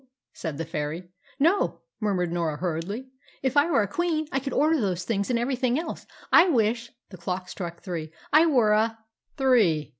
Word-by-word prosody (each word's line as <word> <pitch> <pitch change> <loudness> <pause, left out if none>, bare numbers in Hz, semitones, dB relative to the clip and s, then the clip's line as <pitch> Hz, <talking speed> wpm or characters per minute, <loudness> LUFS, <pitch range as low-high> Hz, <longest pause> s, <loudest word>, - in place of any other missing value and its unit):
said 160 -5 -5
the 165 - -3
fairy. 160 +3 -4 0.3
"No," 335 +8 +2 0.2
murmured 190 -6 0
Norah 165 -3 -1
hurriedly. 185 - -4 0.3
"If 265 0 0
I 290 +3 +4
were 275 -10 +3
a - - -2
queen, 315 - -1
I 270 - +1
could 275 0 -5
order 305 0 +2
those 185 -4 -1
things 200 +1 -1
and 245 - +2
everything 250 +1 0
else. 325 +1 -5 0.2
I 360 - +7
wish" 235 -3 +1 0.2
the 185 - -9
clock 180 +1 -4
struck 170 -3 -7
three 165 -5 -5 0.2
"I 315 +2 +7
were 245 -8 +4
a 225 +1 +2 0.2
" - - -46
"Three!" 220 - +3
220 Hz, 185 wpm, -26 LUFS, 175-270 Hz, 0.3 s, I